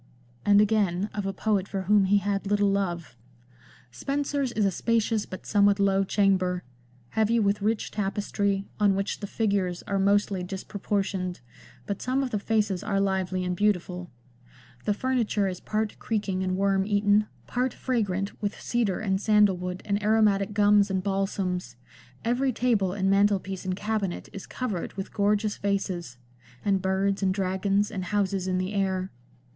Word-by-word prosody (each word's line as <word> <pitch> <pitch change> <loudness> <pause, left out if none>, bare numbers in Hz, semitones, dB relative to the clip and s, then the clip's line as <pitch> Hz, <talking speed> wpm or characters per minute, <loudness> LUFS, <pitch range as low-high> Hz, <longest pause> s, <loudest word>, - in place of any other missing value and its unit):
And 205 +4 +5
again, 205 -2 +1
of 205 -2 -3
a - - 0
poet 200 0 0
for 195 -2 -3
whom 205 +1 +4
he 200 +2 +4
had 200 0 -1
little 205 0 +2
love: 175 -8 -2 0.3
— 120 -1 -29
" 125 0 -27
Spenser's 280 - -1
is 215 - +1
a 195 - +2
spacious 225 +1 0
but 185 - -8
somewhat 205 -1 +3
low 195 0 +3
chamber, 185 -2 +1 0.5
heavy 220 +1 +2
with 205 -1 +1
rich 215 +1 0
tapestry, 200 -1 -1
on 205 -2 +4
which 195 +1 -2
the 205 - -5
figures 195 -5 -1
are 200 -1 -1
mostly 200 -1 +2
dispro 190 +2 -7
portioned, 190 -4 -1 0.4
but 200 - -4
some 260 +2 0
of 255 - -3
the 210 - 0
faces 210 -3 0
are 200 -2 0
lively 190 -2 0
and 180 0 -1
beautiful; 180 -3 0 0.8
the 210 - +2
furniture 230 -5 0
is 180 -1 -4
part 215 0 -2
creaking 205 -4 -1
and 185 0 -1
worm 195 0 +2
eaten, 205 +1 +2 0.2
part 250 +1 -1
fragrant 205 -7 -2
with 205 -1 -3
cedar 230 -6 0
and 195 -3 0
sandal 210 -3 +4
wood 180 +1 -5
and 205 0 0
aromatic 210 -2 +3
gums 205 -1 +5
and 190 -1 -1
balsams; 195 - -2 0.5
every 255 +3 +1
table 220 -6 +1
and 190 0 -1
mantelpiece 195 -1 +1
and 185 -1 -1
cabinet 205 -3 -3
is 195 - -8
covered 215 -9 -4
with 195 0 -6
gorgeous 205 +1 +1
vases, 185 -8 -2 0.5
and 195 -2 +2
birds, 195 +1 0
and 190 -1 +1
dragons, 195 +1 0
and 185 -2 -4
houses 195 -1 0
in 185 -1 0
the 185 +2 -2
air." 190 -1 -1
200 Hz, 165 wpm, -27 LUFS, 190-210 Hz, 0.8 s, And